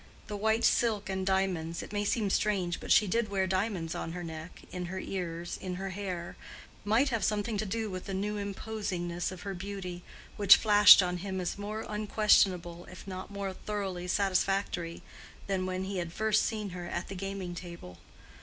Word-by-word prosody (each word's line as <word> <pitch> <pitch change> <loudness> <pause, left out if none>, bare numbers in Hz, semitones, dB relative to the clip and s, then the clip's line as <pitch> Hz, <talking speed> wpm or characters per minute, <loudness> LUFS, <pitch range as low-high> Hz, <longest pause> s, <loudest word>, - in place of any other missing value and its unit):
The 210 - -5
white 220 +2 +1
silk 215 -4 +2
and 190 0 -2
diamonds—it 185 -3 -1
may 205 0 0
seem 205 -1 0
strange, 190 -5 +1
but - - -5
she 215 - +7
did 215 +3 0
wear 195 -1 +1
diamonds 185 -3 -1
on 165 - -4
her 180 0 -5
neck, 160 +1 -8
in 180 -1 -4
her 185 +2 -5
ears, 175 -3 -4
in 185 -1 -4
her 190 +1 -4
hair—might 200 +5 -2
have 230 -5 -1
something 210 +1 0
to 215 - -1
do 220 +3 -2
with 185 -2 -5
the 195 - -3
new 210 +2 -2
imposingness 195 -4 -3
of 185 - -9
her 200 -1 -3
beauty, 185 -1 -6 0.4
which 205 -2 +9
flashed 210 -2 +8
on 180 0 -1
him 190 +1 -4
as 180 - -2
more 215 +2 -4
unquestionable 200 -5 +2
if 185 - -11
not 185 -1 -6
more 200 -1 -4
thoroughly 190 -3 -4
satisfactory 190 -3 0 0.4
than 190 -2 -1
when 185 0 -2
he 190 -1 -3
had 170 -1 -4
first 215 +4 +2
seen 215 -3 -3
her 175 0 -6
at 175 +1 -3
the - - -6
gaming 195 -1 -4
table. 170 - -9
190 Hz, 180 wpm, -30 LUFS, 180-205 Hz, 0.4 s, which